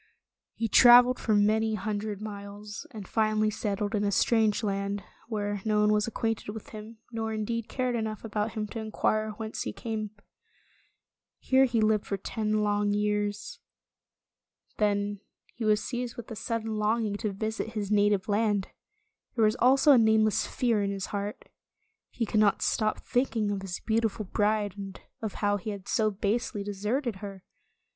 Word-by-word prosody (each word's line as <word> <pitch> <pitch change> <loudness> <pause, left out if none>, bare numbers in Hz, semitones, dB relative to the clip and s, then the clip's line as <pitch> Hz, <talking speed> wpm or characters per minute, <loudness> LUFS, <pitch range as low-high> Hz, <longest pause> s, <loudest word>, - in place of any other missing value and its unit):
He 230 - -1
traveled 245 +3 +7
for 215 - +1
many 215 +2 +3
hundred 210 0 -3
miles, 205 0 -8
and 205 -4 -9
finally 215 -1 +1
settled 205 0 -2
in 210 -1 +1
a 200 - +1
strange 220 +1 +2
land, 200 -1 -2 0.2
where 205 -3 -2
no 215 -1 +1
one 210 0 +4
was 210 +1 +1
acquainted 225 -2 -2
with 220 - -9
him, 215 +1 -9
nor 225 -1 -3
indeed 220 +1 -3
cared 255 -1 -1
enough 220 -2 -3
about 210 0 -2
him 215 -2 -2
to 225 - -5
inquire 215 0 0
whence 220 -1 -5
he - - -2
came. 220 -2 -4 1.3
Here 265 0 +4
he 235 -3 +1
lived 215 -1 +2
for 200 - -1
ten 215 +2 -1
long 205 0 +1
years. 210 0 -1 1.2
Then 205 -1 +1 0.3
he 230 - -4
was 210 0 +3
seized 245 -1 -4
with 240 - -8
a - - -4
sudden 225 0 -3
long 220 +2 +1
ing 205 -1 -2
to 215 -1 -2
visit 220 +2 -3
his 210 -2 -3
native 205 -2 +3
land. 205 -2 +1 0.7
There 225 -2 +4
was 215 +1 +3
also 265 +4 +5
a 260 - +7
nameless 220 -1 +3
fear 230 -4 +1
in 200 - 0
his 195 -1 -3
heart. 205 +1 -4 0.6
He 235 - -2
could 215 - +1
not 210 -2 +3
stop 215 -1 0
thinking 230 -4 0
of 200 -1 -2
his 185 -2 -5
beautiful 220 -1 0
bride, 205 0 0
and 195 -1 -7 0.2
of 220 -3 -4
how 205 0 +3
he 205 +2 -6
had 200 -2 -6
so 215 -1 +2
basely 210 +1 -1
de 205 - -4
serted 215 +3 -2
her. 195 -1 -8
215 Hz, 170 wpm, -28 LUFS, 205-225 Hz, 1.3 s, traveled